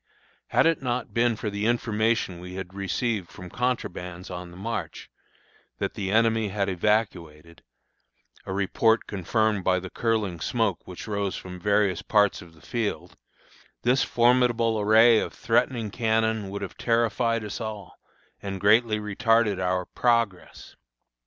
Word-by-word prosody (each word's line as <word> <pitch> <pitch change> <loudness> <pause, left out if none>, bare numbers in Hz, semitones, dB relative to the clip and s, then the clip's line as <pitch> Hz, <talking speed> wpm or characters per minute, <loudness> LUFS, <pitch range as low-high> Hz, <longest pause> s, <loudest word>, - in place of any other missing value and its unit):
Had - - +3
it 165 -3 +2
not 125 -2 -3
been 120 0 +2
for 105 -1 -4
the 100 +2 -1
information 115 -5 0
we 90 +1 -9
had 95 -1 -7
received 100 0 -2
from 90 -1 -11
contrabands 90 -8 -3
on 90 0 -6
the 85 - -13
march, 115 +4 -5 0.7
that - - -3
the 95 -2 -4
enemy 115 0 +3
had 100 0 -1
evacuated, 85 -5 -2 0.9
a - - -4
report 105 +4 +2
confirmed 105 +1 0
by 90 0 +2
the 95 0 -9
curling 110 -7 -1
smoke 110 +1 -1
which 90 +3 -8
rose 100 -2 -2
from 90 -1 -8
various 100 -1 +1
parts 105 -2 +2
of 85 -2 -15
the 80 - -20
field, 115 -3 -3 0.7
this 125 +2 +3
formidable 120 -2 +2
array 110 +2 +6
of - - -4
threatening 115 -1 0
cannon 110 -2 0
would 100 +1 -5
have 95 - -7
terrified 115 0 +1
us 105 +2 -6
all, 110 -2 -7 0.4
and 95 -1 -5
greatly 110 +2 +4
retarded 105 -1 +1
our 90 0 0
progress. 115 -6 -1
105 Hz, 145 wpm, -26 LUFS, 95-115 Hz, 0.9 s, array